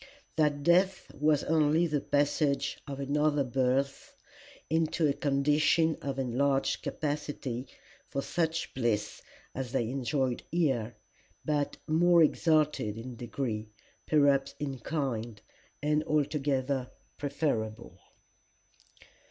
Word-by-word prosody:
that 150 -3 +1
death 185 +4 +2
was 150 0 +2
only 160 +1 +3
the 150 -4 0
passage 145 -1 +1
of 140 -1 -5
another 145 +1 +1
birth 130 +2 -1 0.5
into 160 0 +1
a 140 - +2
condition 150 +3 +2
of 140 -1 -3
enlarged 135 +2 +1
capacity 145 -4 -3 0.4
for 140 - -3
such 165 +2 -1
bliss 115 -5 -1 0.3
as 130 -2 -4
they 135 - +2
enjoyed 130 -1 -1
here, 130 -10 0 0.5
but 145 -2 0
more 170 +2 +5
exalted 150 - +2
in 120 +2 -7
degree, 115 -2 -4 0.4
perhaps 140 -2 +3
in 140 -3 -4
kind, 120 -6 -3 0.4
and 150 +1 +2
altogether 140 -3 0 0.3
preferable." 135 -7 -2
140 Hz, 105 wpm, -30 LUFS, 130-150 Hz, 0.5 s, more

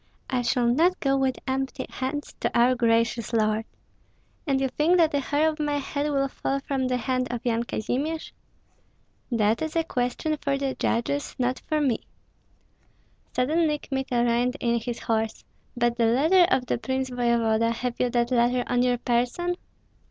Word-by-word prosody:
I 255 -2 +1
shall 245 0 +1
not 325 +10 +3
go 275 -1 +2
with 265 -1 +1
empty 265 0 -2
hands 270 +3 -4
to - - 0
our 245 +2 +5
gracious 230 -1 +1
lord." 215 0 +1 0.8
"And 270 -2 +2
you 270 - +1
think 300 +7 +2
that 325 -3 +3
a 285 - +2
hair 290 +3 +1
of 310 0 -2
my 295 -1 0
head 285 +1 -2
will 275 -1 +1
fall 275 0 -2
from 270 -1 -2
the 250 0 0
hand 255 +1 -1
of 240 -2 -3
Yan 235 0 +1
Kazimir?" 275 +9 -2 1.1
"That 220 -1 +2
is 315 0 -3
a 330 - +2
question 295 +2 -1
for 280 -1 -1
the 275 -1 -1
judges, 280 +5 -1
not 250 0 0
for 310 - +1
me." 270 -6 +1 1.4
Suddenly 300 +4 +2
Kmita 265 -4 -1
reined 245 +3 +1
in 235 -1 +1
his 235 +1 -5
horse: 220 -1 -1 0.3
"But 240 0 +1
the 230 -2 +3
letter 320 +10 +5
of 260 -9 +2
the - - -1
prince 260 +1 -2
voevoda, 230 -2 +2
have 240 +1 -3
you 250 - +2
that 240 0 0
letter 245 0 +2
on 245 0 +1
your 250 -1 +2
person?" 250 +10 0
255 Hz, 175 wpm, -26 LUFS, 235-285 Hz, 1.4 s, our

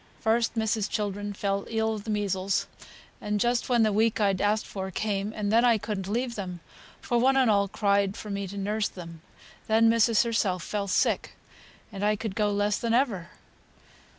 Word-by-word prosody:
First, 230 +1 +1
missis's 220 -1 0
children 205 -2 -3
fell 200 0 -2
ill 220 -1 0
of 210 -2 -7
the - - -6
measles, 200 -2 0 0.7
just 240 +4 0
when 240 -2 +4
th' 215 - +1
week 220 +2 +2
I'd 195 -3 +1
ask'd 210 +1 +1
for 190 -1 -5
came, 205 +1 -2
and 210 -1 -2
I 235 0 +5
couldn't 205 -2 -4
leave 240 +4 -1
them, 185 -5 -6 0.4
for 240 - 0
one 265 +2 +3
and 255 -4 +4
all 200 -1 +3
cried 200 0 +1
for 210 - -7
me 200 0 -3
to 200 +2 -8
nurse 210 +2 -1
them. 170 -3 -10 0.5
Then 225 +1 +4
missis 230 -1 +4
herself 205 -7 0
fell 205 -1 -3
sick, 185 - 0 0.6
and 200 -1 -5
I 210 +1 +3
could 220 -1 -5
go 210 0 +1
less 205 0 0
than 230 -1 0
ever. 210 -10 0
210 Hz, 180 wpm, -27 LUFS, 200-225 Hz, 0.7 s, I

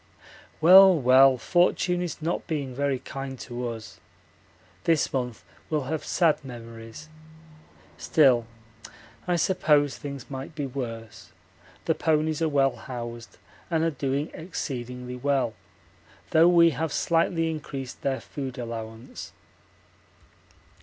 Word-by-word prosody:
Well, 185 +1 +8
well, 130 +1 +6
fortune 175 +4 +1
is 165 -3 -5
not 170 +2 -2
being 145 -5 -3
very 140 +1 0
kind 135 +1 -7
to 120 0 -5
us. 115 -2 -9 0.9
This 165 -3 +2
month 125 -3 -3 0.3
will 150 -3 0
have 155 +4 -3
sad 165 -4 +1
memories. 115 +1 -10 0.9
Still 125 -7 +3 0.8
I 175 - +2
suppose 150 -5 +2
things 140 -3 -7
might 135 +3 -7
be 145 -2 -3
worse; 115 -4 -7 0.5
the - - +2
ponies 155 0 0
are 160 - +2
well 135 -2 +2
housed 120 -2 -8 0.3
and 165 -2 +1
are 165 - +1
doing 140 +1 -2
exceedingly 125 -6 -6
well, 135 -3 0 0.8
though 160 +2 +6
we 170 -1 +6
have 160 +2 -3
slightly 165 0 +1
increased 135 -4 -7
their 135 -1 -1
food 135 -3 -6
allowance. 115 -1 -7
140 Hz, 120 wpm, -26 LUFS, 125-160 Hz, 0.9 s, Well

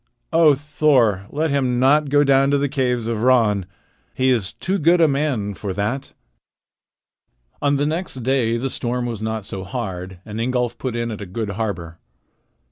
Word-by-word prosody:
O 160 -3 +6
Thor, 135 -9 +2
let 155 +1 -1
him 130 -3 +1
not 145 +3 +4
go 145 +1 +4
down 135 -1 +4
to 140 - +3
the 140 0 0
caves 125 -4 -1
of 115 -2 -2
Ran! 110 -7 +3 0.5
He 130 0 +2
is 110 -6 0
too 195 +2 -2
good 170 +3 +4
a 165 - +6
man 135 -8 -1
for 100 0 -5
that." 105 +8 -3 1.5
On 145 0 +2
the 140 +1 +1
next 155 -5 -3
day 120 -3 +1
the 130 +2 -3
storm 120 0 -2
was 115 -3 -4
not 110 -2 -3
so 95 -3 -5
hard, 95 -4 -5
and 105 0 -6
Ingolf 125 -1 -1
put 130 -3 -3
in 115 0 -2
at 105 - -6
a 100 - -6
good 105 +3 -4
harbor. 90 -6 -4
125 Hz, 180 wpm, -21 LUFS, 105-140 Hz, 1.5 s, O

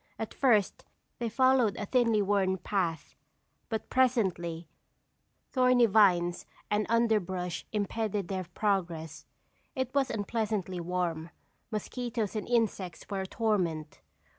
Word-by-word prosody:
At 220 - -5
first 220 -8 +2 0.4
they 235 -1 -1
followed 255 -2 +3
a 205 - -3
thinly 230 -2 +2
worn 190 -1 +1
path, 175 -5 -2 0.6
but 220 -2 -4
presently 185 -10 +1 0.8
thorny 255 -2 +5
vines 185 -5 +3 0.2
and 210 0 +1
underbrush 190 -8 0
impeded 210 -2 -1
their 190 -2 -3
progress. 170 -5 -2 0.5
It 260 -2 -2
was 275 -2 +2
unpleasantly 205 -3 -2
warm; 170 -2 -2 0.4
mosquitoes 225 0 -3
and 215 - -4
insects 220 -7 0
were 195 -1 -1
a 190 - -4
torment. 180 -9 -1
205 Hz, 115 wpm, -30 LUFS, 180-230 Hz, 0.8 s, thorny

